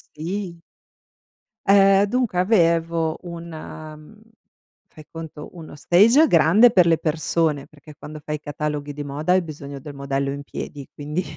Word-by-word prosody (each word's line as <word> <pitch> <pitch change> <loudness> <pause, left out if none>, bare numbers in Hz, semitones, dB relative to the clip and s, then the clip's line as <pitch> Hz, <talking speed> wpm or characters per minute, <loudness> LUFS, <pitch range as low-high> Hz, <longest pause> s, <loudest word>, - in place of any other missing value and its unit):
Sì. 170 +2 -5 1.0
Eh 195 0 +5
dunque 240 -6 0
avevo 165 -4 +1
un 170 -1 -8
mhmm, 155 +4 -11 0.7
fai 155 - -15
conto, 160 -2 -9
uno 165 -4 -11
stage 225 - +5
grande 190 - +5
per 180 -5 +5
le 165 -1 +3
persone, 155 -2 -1
perché 150 0 -16
quando 155 -1 -9
fai 150 0 -3
cataloghi 150 0 -4
di 145 +1 -6
moda 150 +5 -2
hai 185 0 +4
bisogno 145 -3 -8
del 145 +2 -10
modello 140 0 -2
in 140 0 -6
piedi, 140 0 -8
quindi 150 +5 -4
160 Hz, 145 wpm, -22 LUFS, 150-180 Hz, 1.0 s, Eh